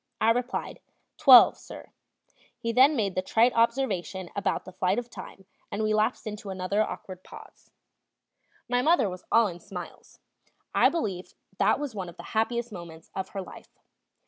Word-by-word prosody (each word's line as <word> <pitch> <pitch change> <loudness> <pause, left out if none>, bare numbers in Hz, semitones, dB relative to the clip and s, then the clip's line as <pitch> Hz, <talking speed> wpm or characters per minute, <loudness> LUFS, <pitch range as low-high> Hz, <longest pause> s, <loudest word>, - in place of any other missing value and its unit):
I 225 - +4
replied: 245 +2 -3 0.4
"Twelve, 265 -6 +8
sir." - - -12 0.7
He 230 - -3
then 265 +6 +5
made 205 -6 0
the 185 - -1
trite 225 +6 +3
observation 230 -6 0
about 200 - -1
the 185 - -9
flight 185 +2 0
of 240 -1 -4
time, 195 - -11 0.3
and 205 +2 -2
we 215 0 +1
lapsed 215 +3 0
into 210 -1 -6
another 190 +2 -1
awkward 185 -3 -5
pause. - - -14 1.0
My 245 0 +1
mother 320 -4 +3
was 180 -1 -8
all 230 0 +5
in 175 -4 -5
smiles; 180 -1 -10 0.6
I - - +5
believe 195 - -4 0.2
that - - +3
was 290 -4 -4
one 190 -4 -5
of 170 - -14
the - - -9
happiest 235 +2 0
moments 170 -4 -11
of 190 -1 -4
her 195 -1 -5
life. - - -14
215 Hz, 170 wpm, -27 LUFS, 185-240 Hz, 1.0 s, Twelve